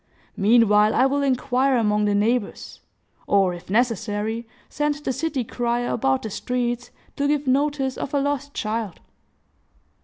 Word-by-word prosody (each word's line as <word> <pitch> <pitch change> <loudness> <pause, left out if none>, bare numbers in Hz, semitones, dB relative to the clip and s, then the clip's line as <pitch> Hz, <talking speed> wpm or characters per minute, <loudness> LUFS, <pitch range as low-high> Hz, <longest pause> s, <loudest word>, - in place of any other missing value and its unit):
Meanwhile, 210 0 +4
I 260 - +4
will 280 +1 +1
inquire 265 0 +1
among 210 -2 +1
the 205 -1 +1
neighbors; 220 +2 -1 0.5
or, 195 -3 +3
if 175 +1 -11
necessary, 225 0 -1 0.2
send 295 0 -1
the 290 -2 -3
city 280 -1 -2
crier 240 +1 -2
about 135 - 0
the 220 - -5
streets, 245 +2 -2 0.3
to 285 - +1
give 295 0 0
notice 275 0 0
of 280 - -4
a - - +3
lost 285 0 -2
child." 215 -3 -3
240 Hz, 145 wpm, -23 LUFS, 210-275 Hz, 0.5 s, Meanwhile